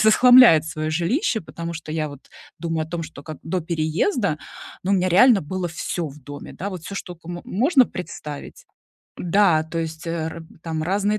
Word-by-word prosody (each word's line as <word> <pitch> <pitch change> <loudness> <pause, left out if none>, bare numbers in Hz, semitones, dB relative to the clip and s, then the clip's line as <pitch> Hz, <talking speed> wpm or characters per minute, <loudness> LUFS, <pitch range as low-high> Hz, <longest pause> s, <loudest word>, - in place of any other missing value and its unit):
з - - +3
захламляет 235 -6 +8
свое 155 -1 -3
жилище. 200 - 0
Потому 170 0 -6
что 155 -1 -7
я 155 -1 -1
вот 145 -1 -13 0.3
думаю 165 -2 -2
о 160 - -19
том, 170 -1 -3
что, 160 -3 -10
как 155 -1 -8
до 180 +3 -2
переезда, 165 - 0 0.5
ну, 195 - +1
у - - +5
меня 185 0 +2
реально 210 +3 +6
было 185 +3 -3
всё 170 0 -3
в 145 +2 -13
доме, 145 +2 -9
да, 200 +3 -4
вот 185 -4 -7
всё, 200 - -6
что 180 -3 -6
ко 165 +1 -16
мо 175 0 -5
можно 260 - +4
представить. 150 -5 -8 0.5
Да, 175 -3 +3
то 160 +1 -7
есть, 160 +1 -4
э, - - -2
р 165 0 -4 0.2
там 160 -1 -3
разные 200 +5 +1
170 Hz, 205 wpm, -23 LUFS, 160-195 Hz, 0.5 s, захламляет